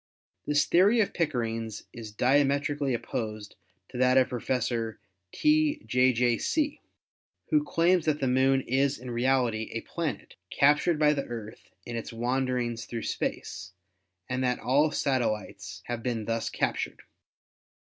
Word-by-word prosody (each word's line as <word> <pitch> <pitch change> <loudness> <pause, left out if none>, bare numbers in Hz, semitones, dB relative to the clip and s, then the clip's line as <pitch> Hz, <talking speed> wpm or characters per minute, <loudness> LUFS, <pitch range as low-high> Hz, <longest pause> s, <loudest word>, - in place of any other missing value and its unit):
This 145 0 +3
theory 200 +7 +4
of 205 -3 +1
Pickering's 115 - -2
is 110 -2 -8
diametrically 140 +3 +2
op - - -5
posed 110 -3 -5 0.3
to 125 - -7
that 130 0 +4
of 130 -1 +4
Professor 120 -3 -2 0.3
T. 305 0 +2
J. 125 +1 +3
J. 120 -1 +1
See, 295 -2 -1 0.7
who 300 -1 +4
claims 175 - +2
that 150 -2 +1
the 135 - 0
Moon 130 +1 +3
is 135 +3 +1
in 125 0 -8
reality 120 -2 +1
a 115 - -3
planet, 165 -6 -5
captured 150 +4 +3
by 150 0 +4
the 140 -2 -2
Earth 110 -2 -8 0.2
in 120 - -5
its 115 - -5
wanderings 120 0 -1
through 115 -2 -5
space, 90 -1 -4 0.5
and 125 +1 -2
that 125 -1 +1
all 145 +5 +2
satellites 105 -9 -2
have 120 -1 -4
been 115 -3 -2
thus 115 0 -1
captured. - - -2
125 Hz, 145 wpm, -28 LUFS, 115-145 Hz, 0.7 s, theory